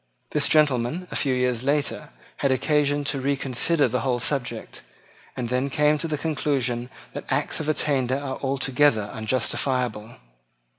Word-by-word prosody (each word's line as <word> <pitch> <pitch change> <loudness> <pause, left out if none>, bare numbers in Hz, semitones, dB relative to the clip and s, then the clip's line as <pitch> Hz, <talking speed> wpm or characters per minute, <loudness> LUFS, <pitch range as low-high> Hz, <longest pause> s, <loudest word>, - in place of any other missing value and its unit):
This - - +2
gentleman, 150 +3 +2
a - - -5
few 135 -3 +1
years 125 -1 0
later, 145 +1 0 0.3
had 140 - +1
occasion 145 +2 +2
to 140 -1 -2
reconsider 140 +2 +1
the 125 +1 -1
whole 125 +1 0
subject, 120 -3 -2 0.6
and 120 -2 -3
then 130 +3 0
came 150 +2 +2
to 165 - 0
the 155 -2 -2
conclusion 135 -5 -1 0.2
that - - -6
acts - - 0
of 155 -1 -2
attainder 135 -4 +1
are 140 -2 -4
altogether 135 -5 +1
unjustifiable. 120 0 -1
135 Hz, 145 wpm, -24 LUFS, 125-145 Hz, 0.6 s, This